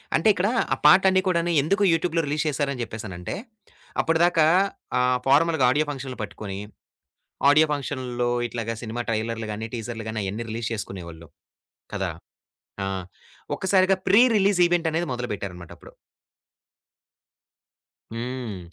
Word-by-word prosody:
అంటే, 160 - +2
ఇక్కడ 195 +1 0 0.2
ఆ! - - +2
పాటలన్ని 190 +3 +6
కూడాను 175 -1 +1
ఎందుకు 200 +8 +1
యూట్యూబ్‌లో 165 0 0
రిలీజ్ 150 +2 -1
చేసారని 140 -3 -2
చెప్పేసనంటే, 100 -6 -6 0.7
అప్పటిదాకా 165 0 +3 0.5
ఆహ్, 125 0 +3
ఫార్మల్‌గా 145 0 +4
ఆడియో 150 +3 +2
ఫంక్షన్‌లు 135 -2 -7
పట్టుకొని 100 -2 -6 0.9
ఆడియో 155 +2 +6
ఫంక్షన్‌లో 130 -4 -2 0.2
ఇట్లాగా 115 -1 -4
సినిమా 120 +1 -4
ట్రైలర్లు 115 0 -2
గాని, 110 +2 -4
టీజర్లు 115 -1 -5
గాని 110 - -4
అయన్ని 105 +5 -4
రిలీజ్ 115 +1 -3
చేసుకునేవాళ్ళు. 85 -6 -7 0.7
కదా! - - -1 0.7
ఆ! - - -2 0.7
ఒక్కసారిగా 190 0 +3
ప్రి 215 +4 +7
రిలీజ్ 200 -1 +3
ఈవెంట్ 170 -1 +1
అనేది 170 +2 0
మొదలు 125 0 -4
పెట్టారన్నమాట 90 -4 -8
అప్పుడు. - - -15 2.2
హ్మ్. 120 -4 -5
130 Hz, 120 wpm, -24 LUFS, 110-165 Hz, 2.2 s, ప్రి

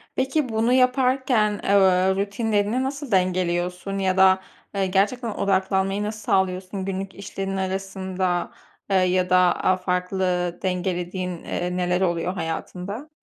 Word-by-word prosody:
Peki 265 +1 0
bunu 225 +2 +1
yaparken, 255 -4 +2
eee, - - -3
uuu, 200 - +6
ııı, 185 0 +3
rutinlerini 205 +4 0
nasıl 275 -2 -4
dengeliyorsun 180 +1 0
ya 190 -1 0
da, 190 0 +5 0.3
eee, 195 -1 +1
gerçekten 215 +5 +1
odaklanmayı 195 0 0
nasıl 215 +1 -4
sağlıyorsun 190 -1 -1
günlük 195 0 -4
işlerinin 195 -1 -4
arasında? 190 -1 -2 0.4
Eee, 195 - +2
ya 185 0 +2
da, 185 - +5
aaa, 180 +1 +3
farklı, 180 -1 -1
dengelediğin, 180 -1 -2
eee, 180 +1 -3
neler 180 0 0
oluyor 175 0 0
hayatında? 190 - -5
190 Hz, 130 wpm, -23 LUFS, 180-205 Hz, 0.4 s, uuu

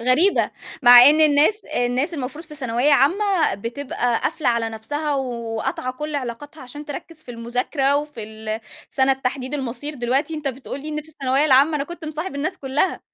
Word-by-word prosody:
غريبة، 255 +12 +3 0.3
مع 245 0 +10
إن 295 +5 +6
الناس، 310 +8 +4
الناس 250 +7 -1
المفروض 290 +3 -5
في 305 - -12
ثانوية 255 0 +1
عامة 350 - +3
بتبقى 240 +2 -2
قافلة 285 - -1
على 235 -1 +1
نَفْسها، 290 +7 -3
وقاطعة 240 -1 -3
كل 300 +3 -6
علاقاتها 285 +3 -6
عشان 290 +4 -9
تركّز 310 +2 -8
في 250 - -11
المذاكرة، 250 +4 0
وفي 295 -5 -4
ال 220 +1 -5 0.3
سنة 270 0 +3
تحديد 260 +1 -3
المصير 280 +2 -4
دلوقتي 270 +5 0
أنت 300 -2 -3
بتقول 265 +1 -6
لي 300 - -7
إن 300 0 -3
في 310 - -16
الثانوية 275 -2 0
العامة، 290 +2 +5
أنا 280 - -2
كُنت 345 +1 -9
مصاحب 310 +2 -5
الناس 305 +7 -2
كلّها، 285 +7 -1
275 Hz, 175 wpm, -22 LUFS, 245-300 Hz, 0.3 s, مع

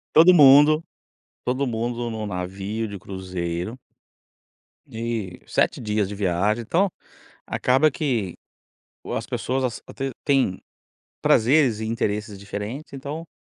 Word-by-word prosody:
Todo 170 +3 +8
mundo 150 +1 +7 0.6
todo 130 +3 0
mundo 120 0 -2
no 110 -1 -4
navio 95 +4 -3
de 100 -2 -7
cruzeiro 90 +3 -4 1.1
e 110 -5 -4
7 - - +1
dias 105 -2 0
de 100 - -6
viagem 100 +3 +1
então, 180 - +1 0.6
acaba 135 +5 +3
que, 120 - -2 0.8
as - - -3
pessoas 130 -2 -2
até 135 0 -4
têm 135 -10 +2 0.6
prazeres 125 -1 +4
e 110 - -3
interesses 105 -2 -2
diferentes 105 +9 -6
então, 145 +5 -6
115 Hz, 110 wpm, -24 LUFS, 100-135 Hz, 1.1 s, Todo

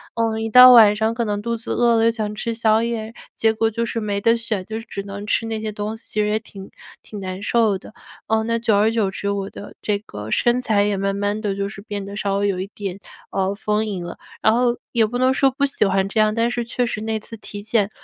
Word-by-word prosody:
呃， 225 -1 0
一 225 0 -2
到 250 +3 +10
晚 220 -4 +8
上 220 +1 +1
可 235 +1 -1
能 205 -1 -2
肚 235 +2 -2
子 225 - -7
饿 240 -1 +3
了 225 - +3
又 230 - +4
想 215 -2 -3
吃 230 +2 -3
宵 225 -1 +2
夜， 225 -1 -3 0.2
结 220 0 +3
果 225 0 +1
就 230 +2 -1
是 230 0 -3
没 205 -1 -2
得 230 +2 +4
选， 220 -5 -2
就 220 +2 -5
是 225 - -11
只 200 - -5
能 200 +1 -7
吃 225 - +1
那 220 -1 -3
些 215 -1 -3
东 210 +1 -4
西， - - -18
其 215 - -1
实 210 - +1
也 215 +1 +1
挺 195 -3 -12 0.3
挺 210 - -9
难 185 0 -5
受 215 -2 +2
的。 195 - -14 0.3
呃， 220 0 +1
那 230 +1 0
久 225 -2 +2
而 215 +2 +3
久 220 -4 +1
之， 200 +1 -3
我 200 0 -3
的 205 - -10
这 205 -1 0
个 105 - -9
身 240 - +2
材 215 -5 +2
也 205 -1 0
慢 195 0 -1
慢 205 +1 -1
地 205 -3 -2
就 200 0 -2
是 200 0 -9
变 205 -1 -5
得 200 +1 -8
稍 200 -1 -1
微 200 0 +1
有 190 -2 -1
一 190 - -3
点， 195 -1 -5 0.3
呃， 195 0 0
丰 210 +1 0
盈 195 -4 -4
了。 175 - -7 0.2
然 220 - +4
后 240 0 +2
也 230 -2 +3
不 235 +3 -3
能 255 +1 +3
说 270 0 +3
不 275 +2 0
喜 275 -6 0
欢 195 0 +1
这 220 - -1
样， 215 0 +3
但 230 +1 +2
是 240 -1 -2
确 245 +1 -1
实 225 -2 -4
那 220 0 -2
次 225 +2 -11
体 205 -1 -8
检 215 -2 +1
215 Hz, 295 characters per minute, -21 LUFS, 200-230 Hz, 0.3 s, 到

